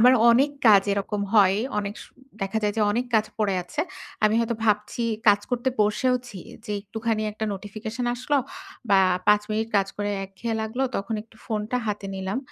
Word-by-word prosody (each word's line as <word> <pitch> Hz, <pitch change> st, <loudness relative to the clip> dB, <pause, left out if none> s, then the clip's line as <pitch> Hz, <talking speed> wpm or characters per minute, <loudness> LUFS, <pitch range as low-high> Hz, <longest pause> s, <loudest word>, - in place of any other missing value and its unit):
আমার 250 Hz, +3 st, +7 dB, 0.2 s
অনেক 265 Hz, +5 st, +4 dB, 0.2 s
কাজ 205 Hz, -3 st, +8 dB
এরকম 200 Hz, +1 st, -2 dB
হয়। 195 Hz, -2 st, +6 dB, 0.2 s
অনেক 205 Hz, 0 st, -3 dB
স -, -, -11 dB, 0.4 s
দেখা 195 Hz, +3 st, -1 dB
যায় 205 Hz, -1 st, 0 dB
যে -, -, +1 dB
অনেক 235 Hz, +4 st, 0 dB
কাজ 215 Hz, -1 st, +4 dB
পড়ে 205 Hz, -3 st, +1 dB
আছে। 175 Hz, -, -4 dB, 0.4 s
আমি 215 Hz, +1 st, +4 dB
হয়তো 235 Hz, 0 st, 0 dB
ভাবছি 210 Hz, +2 st, +1 dB, 0.3 s
কাজ 205 Hz, 0 st, +6 dB
করতে 245 Hz, +1 st, 0 dB
বসেওছি, 245 Hz, +1 st, 0 dB, 0.3 s
যে 210 Hz, -, -4 dB
একটুখানি 220 Hz, +2 st, -2 dB
একটা 220 Hz, +1 st, -4 dB
নোটিফিকেশন 215 Hz, +5 st, -5 dB
আসলো 255 Hz, +4 st, 0 dB, 0.5 s
বা, 195 Hz, -, +6 dB, 0.3 s
৫ 210 Hz, 0 st, +5 dB
মিনিট 220 Hz, +1 st, -1 dB
কাজ 195 Hz, -1 st, +3 dB
করে 205 Hz, 0 st, -2 dB
একঘেয়ে 220 Hz, +4 st, -4 dB
লাগলো, 220 Hz, +4 st, -2 dB
তখন 210 Hz, +3 st, -3 dB
একটু 225 Hz, 0 st, -23 dB
ফোনটা 215 Hz, +1 st, -2 dB
হাতে 205 Hz, -1 st, -3 dB
নিলাম। 190 Hz, +4 st, -3 dB
215 Hz, 175 wpm, -25 LUFS, 205-230 Hz, 0.5 s, কাজ